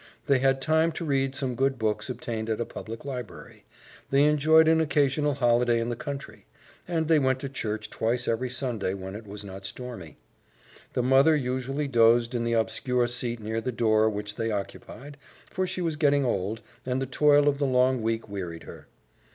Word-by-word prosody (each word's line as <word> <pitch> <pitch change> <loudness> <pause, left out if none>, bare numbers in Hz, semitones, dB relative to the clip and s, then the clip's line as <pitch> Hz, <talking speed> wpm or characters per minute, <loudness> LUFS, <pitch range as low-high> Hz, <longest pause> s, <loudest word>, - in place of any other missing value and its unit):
They 140 -3 +3
had 135 0 +2
time 160 +2 +3
to 165 - -4
read 135 -2 0
some 135 -3 -1
good 135 +2 0
books 110 +1 -1
obtained 115 -3 -4
at 110 - -1
a 120 - -1
public 115 +3 -8
library; 125 -5 -8 0.4
they 135 +1 +4
enjoyed 155 +2 +5
an 160 0 +4
occasional 145 -1 +1
holiday 120 -2 +2
in 115 +1 -2
the 120 - -2
country; 135 -7 -7 0.4
and 165 -3 -1
they 160 -1 +5
went 130 -1 +1
to 140 - -4
church 110 -5 -4
twice 120 +2 -1
every 120 +3 0
Sunday 120 -7 -2
when 95 0 -7
it 105 0 -9
was 100 +1 -8
not 95 0 -9
stormy. 95 -7 -8 0.8
The 125 - 0
mother 135 +5 +5
usually 135 +1 -2
dozed 120 -1 +4
in 120 -1 -1
the 115 - 0
obscure 120 +2 0
seat 120 -1 -3
near 110 +1 -3
the 125 - -2
door 110 -2 +3
which 105 0 -5
they 115 0 -1
occupied, 125 +7 -6 0.3
for 185 0 -1
she 185 0 -4
was 165 -3 -1
getting 145 -2 +3
old, 110 0 -2 0.2
and 130 0 -1
the 135 - -1
toil 145 +2 +4
of 140 -1 +2
the 140 - +1
long 130 -1 +2
week 115 0 -2
wearied 90 -5 -6
her. - - -12
125 Hz, 190 wpm, -27 LUFS, 115-140 Hz, 0.8 s, enjoyed